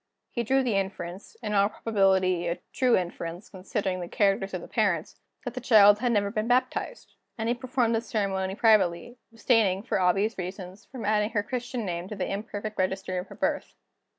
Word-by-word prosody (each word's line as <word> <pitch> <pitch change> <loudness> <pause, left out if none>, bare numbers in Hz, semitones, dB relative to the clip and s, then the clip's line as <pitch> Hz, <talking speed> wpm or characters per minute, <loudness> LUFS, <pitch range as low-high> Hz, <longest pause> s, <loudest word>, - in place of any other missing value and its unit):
He 235 - -1
drew 265 +4 +2
the 235 -5 0
inference 190 - -5
in 210 - -2
all 200 0 +4
probability 190 -5 +1
a 170 - -1 0.2
true 255 -3 +3
inference, 175 0 -5
considering 190 0 -3
the 175 - -5
characters 195 0 +1
of 180 - -4
the - - -10
parents 195 -8 -1 0.3
that 245 - -4
the 255 - -5
child 210 -4 +7
had 245 0 +1
never 200 -2 +1
been 215 0 -2
baptized; 255 - -1 0.2
and 225 0 -2
he 235 - +2
performed 245 -2 0
the 225 - +1
ceremony 195 -4 -2
privately, 210 0 +2
abstaining, 220 -4 +2
for 230 - -1
obvious 195 +4 +1
reasons, 185 +1 -7
from 245 -5 -8
adding 210 0 +2
her 210 -3 -1
Christian 245 0 -4
name 175 -1 -3
to 210 - -6
the 185 -2 -2
imperfect 210 +1 -5
register 185 0 -1
of 180 - -7
her - - -11
birth. - - -2
205 Hz, 190 wpm, -27 LUFS, 185-230 Hz, 0.3 s, child